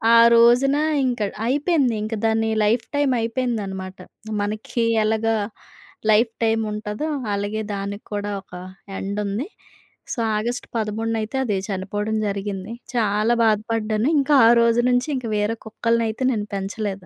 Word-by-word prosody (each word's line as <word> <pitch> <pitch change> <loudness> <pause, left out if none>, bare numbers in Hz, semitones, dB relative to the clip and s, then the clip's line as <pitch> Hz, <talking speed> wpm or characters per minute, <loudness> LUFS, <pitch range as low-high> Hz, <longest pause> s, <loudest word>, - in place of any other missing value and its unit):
ఆ - - +8 0.2
రోజున 245 +4 +5 0.3
ఇంక 245 -2 -1 0.3
అయిపేంది, 280 0 +2
ఇంక 215 +1 -4
దాని 225 0 +2
లైఫ్ 225 +3 +2
టైమ్ 285 -2 +2
అయిపేందనమాట. 215 -6 -3 0.4
మనకి 215 +3 -2 0.2
ఎలాగా 220 +1 +1 0.8
లైఫ్ 225 +2 +4
టైమ్ 225 0 +2
ఉంటుందో, 210 +7 -4 0.3
అలాగే 205 +2 -2
దానికి 200 +1 -5
కూడా 205 0 -2
ఒక 190 - -24 0.5
ఎండ్ 200 +2 -3
ఉంది. 205 - -2 0.7
సో, 255 - -5 0.2
ఆగస్టు 240 +3 -3
13న 225 +1 -1
అయితే 220 +5 -4
అది 205 -5 0
చనిపోవడం 205 +3 -2
జరిగింది. 200 +1 -4 0.2
చాలా 215 +1 +2
బాధపడ్డాను. 220 +2 +1
ఇంకా 280 +1 +3
ఆ - - +7
రోజు 235 +1 +3
నుంచి 245 +4 +1
ఇంకా 245 -3 -4
వేరే 210 +2 0
కుక్కలనయితే 230 +1 0
నేను 210 -2 -3
పెంచలేదు. 195 -1 -4
220 Hz, 135 wpm, -22 LUFS, 205-235 Hz, 0.8 s, ఆ